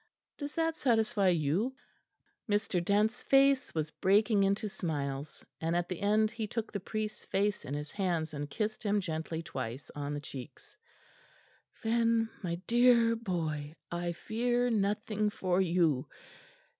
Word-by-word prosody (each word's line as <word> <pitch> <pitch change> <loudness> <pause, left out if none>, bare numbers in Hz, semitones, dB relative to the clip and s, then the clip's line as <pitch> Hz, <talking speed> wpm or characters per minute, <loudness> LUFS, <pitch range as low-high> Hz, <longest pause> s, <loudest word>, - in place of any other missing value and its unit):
Does 285 -1 -5
that 325 -1 0
satisfy 225 -5 +2
you?" 180 - +1 0.7
Mr. 205 -4 +1
Dent's 210 +5 +2
face 275 -3 +4
was 155 -1 -1
breaking 205 +4 +3
into 200 +3 +1
smiles, 145 -6 -4
and 165 +1 0
at 175 0 0
the 180 - -4
end 215 +1 +3
he 225 -2 -4
took 225 +1 -3
the 200 - -3
priest's 215 +2 -4
face 200 +1 0
in 140 - -4
his 150 +1 -5
hands 175 -6 -1
and 145 0 -4
kissed 215 +8 -2
him 205 -1 +1
gently 160 -2 -3
twice 130 -3 -5
on 145 0 -3
the - - -3
cheeks. 135 -4 -10 1.1
"Then, 230 0 +2
my 170 -4 -2
dear 235 -1 +5
boy, 160 -8 -3 0.2
I 175 0 -2
fear 240 +6 0
nothing 210 0 +1
for 185 -3 +1
you. 165 -7 +2
200 Hz, 145 wpm, -31 LUFS, 160-225 Hz, 1.1 s, dear